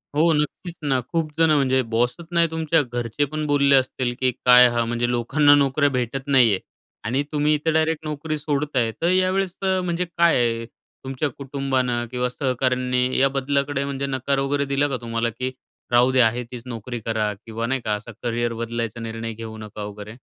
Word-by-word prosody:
हो, 165 +2 +4
नक्कीच 150 +3 -2
ना. 130 -2 +2
खूप 165 -3 -1
जणं, 160 -2 +5
म्हणजे 130 -2 +2
बॉसच 125 +8 0
नाही 170 -1 +3
तुमच्या 160 -1 +1
घरचे 120 +1 -2
पण 155 +2 -4
बोलले 140 -1 +4
असतील 130 -1 0
की 130 -1 +2
काय 125 0 +8
हा, 120 0 0
म्हणजे 120 +1 -1
लोकांना 140 +5 +4
नोकऱ्या 145 +1 +2
भेटत 130 +1 -3
नाही 130 -5 +5
आहे 95 - -1 0.5
आणि 130 +5 0
तुम्ही 150 0 +2
इथं 155 +2 0
डायरेक्ट 160 0 +1
नोकरी 155 +1 -3
सोडत 145 0 -2
आहे. 115 -2 +2
तर 170 - +2
यावेळेस 185 0 +1
अ, 190 -1 +1
म्हणजे 175 0 -1
काय 170 -1 +2
आहे 115 -1 0
तुमच्या 135 +4 -6
कुटुंबानं 130 -3 -2
किंवा 125 0 -1
सहकाऱ्यांनी 125 -1 0
या 135 +1 +4
बदलाकडे 140 +1 0
म्हणजे 140 0 -3
नकार 135 +1 -1
वगैरे 140 +1 0
दिला 140 +1 +1
का 130 - -2
तुम्हाला 115 0 -1
की 125 +3 -4 0.4
"राहू 120 +2 +5
द्या, 125 -3 +5
आहे 120 +2 -3
तीच 125 -2 -7
नोकरी 120 0 -6
करा" 110 -1 -1
किंवा 115 +3 -6
नाही 130 0 -1
का, 105 -2 -1
असा 110 +3 -9
करियर 120 0 -1
बदलायचा 115 -1 -4
निर्णय 115 0 -5
घेऊ 110 0 -8
नका, 105 -1 -8
वगैरे? 105 +2 -8
130 Hz, 190 wpm, -23 LUFS, 120-145 Hz, 0.5 s, काय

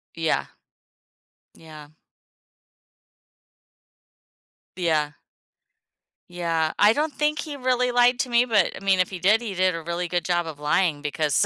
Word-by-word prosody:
Yeah. 165 -1 0 1.1
Yeah. 155 -2 -13 2.9
Yeah. 155 -4 0 1.2
Yeah. 165 -3 -1
I 210 +1 +6
don't 300 +3 -1
think 300 0 -1
he 295 -2 -5
really 250 -1 0
lied 245 0 +3
to 255 - -4
me, 240 +1 +3
but, 210 -7 +2
I - - -10
mean, 190 -1 +2
if 185 - +2
he 185 -2 -7
did, 210 +5 +3
he 215 -4 -5
did 185 -1 +1
a 165 - -5
really 170 +2 -3
good 175 -1 -2
job 175 -2 0
of 150 -2 -8
lying 150 0 0
because 150 -1 0
180 Hz, 140 wpm, -24 LUFS, 160-240 Hz, 2.9 s, I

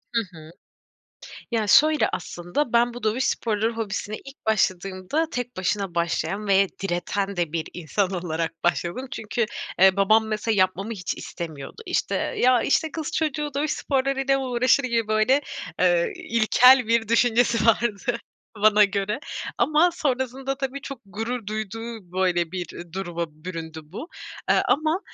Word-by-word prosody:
Hı 230 - +4 0.2
hı. 155 +1 -12 1.0
Ya 225 -3 0
şöyle 305 +9 +5
aslında: 175 - -3
Ben 240 0 +3
bu 245 - -8
dövüş 220 +4 +1
sporları 220 0 0
hobisine 215 -1 -4
ilk 275 +1 -14
başladığımda 195 - 0
tek 245 -2 -4
başına 190 0 -1
başlayan 170 +4 -1
ve 195 0 +5 0.2
direten 195 +2 -2
de 170 -3 -1
bir 165 -1 -2
insan 180 +3 -1
olarak 165 -3 -3
başladım. 175 +8 -1
Çünkü, 225 -2 -2 0.3
eee, 190 +1 +6
babam 215 +3 +4
mesela 215 +1 -1
yapmamı 190 +4 +1
hiç 185 -5 -4
istemiyordu. 160 - -7
İşte, - - -1
ya, 250 -1 +2
işte, 315 +2 +1
"Kız 315 -2 -4
çocuğu 300 -1 -1
dövüş 300 +2 0
sporlarıyla 270 0 0
uğraşır 255 +1 +2
mı!" - - -1
gibi 230 -2 0
böyle, 215 +6 +3 0.4
eee, - - +3
ilkel 250 -4 +5
bir 230 -1 +2
düşüncesi 235 0 +3
vardı 230 +1 +1 0.4
bana 210 -1 +7
göre 205 +4 -2 0.4
ama 310 +4 +4
sonrasında 265 -2 -2
tabii, 275 0 -4
çok 275 -2 -7
gurur 225 +3 -4
duyduğu, 215 -2 -6
böyle, 180 -2 +1
bir 180 -3 -4 0.2
duruma 175 -2 -3 0.2
büründü 165 -3 -6
bu. 190 - -8 0.4
Eee, - - +4
ama, 310 +4 +2
220 Hz, 145 wpm, -24 LUFS, 190-255 Hz, 1.0 s, bana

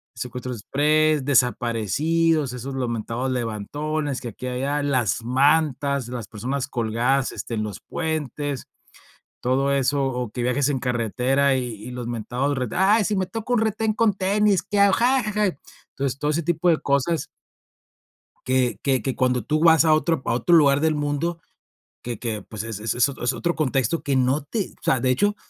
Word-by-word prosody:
secuestro 125 0 -5
exprés, 150 +5 +1
desaparecidos, 135 - +1
esos 130 +2 -6
los 125 -2 -1
mentados 115 +3 -3
levantones 135 +5 -3
que 120 - -5
aquí 125 +4 -7
allá 135 +4 -1
las 125 -6 0
mantas, 140 0 +2
las 120 -3 -6
personas 130 +6 -3
colgadas, 125 +2 0
este, 115 - -5
en 110 - -1
los 105 -2 -6
puentes, 150 -4 -4 0.7
todo 135 +2 +1
eso, 140 +1 +1
o 125 -4 -3
que 120 - -3
viajes 130 +3 +1
en 135 - 0
carretera, 125 +3 +1
y 130 -1 -1
y 110 +4 -9
los 125 -1 -5
mentados, 125 +5 -2
re 125 - -1
ay, 205 +4 +3
si 210 +1 0
me 190 - +1
toca 225 +5 -4
un 240 - +3
retén 220 0 0
con 220 -1 +2
tenis, 200 +1 +2
qué 205 - -1
hago. 200 -1 +5 1.0
Entonces, 135 -1 -2
todo 150 0 0
ese 165 +2 -1
tipo 175 +2 0
de 160 - +4
cosas 140 +2 0 1.2
que 130 -1 +1
que 130 -4 +1
que 130 +3 -2
cuando 125 -3 +1
tú 155 +4 0
vas 160 -1 +6
a 155 -1 +5
otro 160 -2 +1
pa - - -1
a - - +1
otro 170 +8 +4
lugar 140 -2 +5
del 160 0 +2
mundo, 150 +3 -2 0.6
que 120 -3 -5
que 110 -4 -4
pues 105 +1 -7
es 110 -2 -6
es 110 +1 -2
es 120 +3 +3
ot 135 - -8
es 125 +2 +1
otro 170 0 -1
contexto 135 0 0
que 140 -1 0
no 130 +3 +2
te 195 +8 -3
o - - -38
sea, 130 - +2
de 130 +1 +1
hecho, 205 +10 +1
135 Hz, 185 wpm, -23 LUFS, 125-155 Hz, 1.2 s, vas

